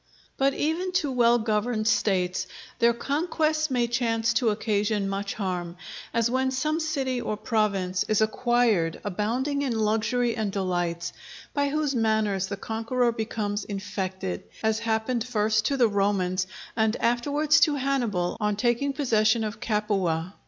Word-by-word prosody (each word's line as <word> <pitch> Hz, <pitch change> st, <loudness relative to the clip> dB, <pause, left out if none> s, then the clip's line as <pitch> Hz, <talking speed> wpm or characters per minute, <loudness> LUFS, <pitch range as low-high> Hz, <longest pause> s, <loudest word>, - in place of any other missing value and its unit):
But 275 Hz, 0 st, +2 dB
even 335 Hz, +5 st, -1 dB
to 310 Hz, -7 st, +1 dB
well 240 Hz, -1 st, +4 dB
governed 215 Hz, 0 st, 0 dB
States, 185 Hz, -4 st, +1 dB, 0.3 s
their 235 Hz, 0 st, +5 dB
conquests 310 Hz, +4 st, 0 dB
may 250 Hz, -2 st, +1 dB
chance 235 Hz, -1 st, 0 dB
to 230 Hz, 0 st, +2 dB
occasion 210 Hz, -1 st, 0 dB
much 200 Hz, +1 st, -3 dB
harm; 180 Hz, -4 st, -3 dB, 0.3 s
as 230 Hz, -1 st, +2 dB
when 260 Hz, +2 st, +1 dB
some 305 Hz, +5 st, 0 dB
city 270 Hz, -6 st, -1 dB
or 215 Hz, -, -3 dB
province 205 Hz, -5 st, 0 dB
is 215 Hz, -, +2 dB
acquired 220 Hz, -6 st, +2 dB
abounding 235 Hz, +9 st, -1 dB
in 255 Hz, -5 st, -1 dB
luxury 225 Hz, +3 st, +1 dB
and 215 Hz, -3 st, -1 dB
delights, 175 Hz, -3 st, -2 dB, 0.4 s
by 285 Hz, -1 st, +1 dB
whose 300 Hz, -1 st, 0 dB
manners 220 Hz, -4 st, +1 dB
the 200 Hz, -, -4 dB
conqueror 230 Hz, +4 st, 0 dB
becomes 215 Hz, -2 st, -3 dB
infected; 190 Hz, -, -4 dB, 0.2 s
as 220 Hz, 0 st, +2 dB
happened 230 Hz, +1 st, 0 dB
first 215 Hz, -2 st, +1 dB
to 280 Hz, -, 0 dB
the 245 Hz, -3 st, +5 dB
Romans, 195 Hz, -3 st, 0 dB, 0.3 s
and 220 Hz, 0 st, +2 dB
afterwards 290 Hz, +6 st, +2 dB
to 300 Hz, -, +4 dB
Hannibal 240 Hz, -11 st, -1 dB
on 210 Hz, -1 st, 0 dB
taking 240 Hz, +5 st, +1 dB
possession 225 Hz, -5 st, +2 dB
of 215 Hz, 0 st, -4 dB
Capua. 195 Hz, -6 st, -1 dB
220 Hz, 145 wpm, -26 LUFS, 205-255 Hz, 0.4 s, their